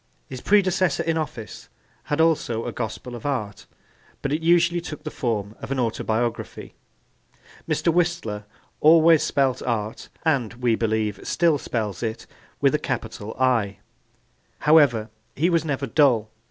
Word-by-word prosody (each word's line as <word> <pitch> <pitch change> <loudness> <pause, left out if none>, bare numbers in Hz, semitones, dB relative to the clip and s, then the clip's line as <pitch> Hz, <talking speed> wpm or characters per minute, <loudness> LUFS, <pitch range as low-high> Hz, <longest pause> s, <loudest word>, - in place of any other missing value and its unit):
His 130 -2 -8
predecessor 185 -4 +2
in 165 -1 0
office 125 -9 -5 0.4
had 145 - -2
also 155 -8 +1
a - - -3
gospel 120 +2 -5
of 120 - -8
art 105 -9 -3 0.6
but 140 - -1
it 155 - -1
usually 170 +1 +3
took 155 -3 -8
the - - -5
form 110 -6 -2
of - - -7
an 135 - -1
autobiography. 115 0 -2 1.0
Mr. 170 - +1
Whistler 170 -12 -1 0.3
always 160 0 +6
spelt 135 -3 +1
art, 110 -3 -3 0.2
and 130 -9 +1
we 120 -1 +1
believe 110 -3 0
still 165 -4 +2
spells 105 -8 -3
it, 110 -2 -4 0.3
with - - +3
a - - +2
capital 105 +2 -4
'I.' 115 -7 +2 0.8
However, 135 -8 +4 0.2
he 170 +6 +2
was 165 -2 +2
never 140 -3 -2
dull. 125 -5 +3
130 Hz, 140 wpm, -24 LUFS, 110-160 Hz, 1.0 s, always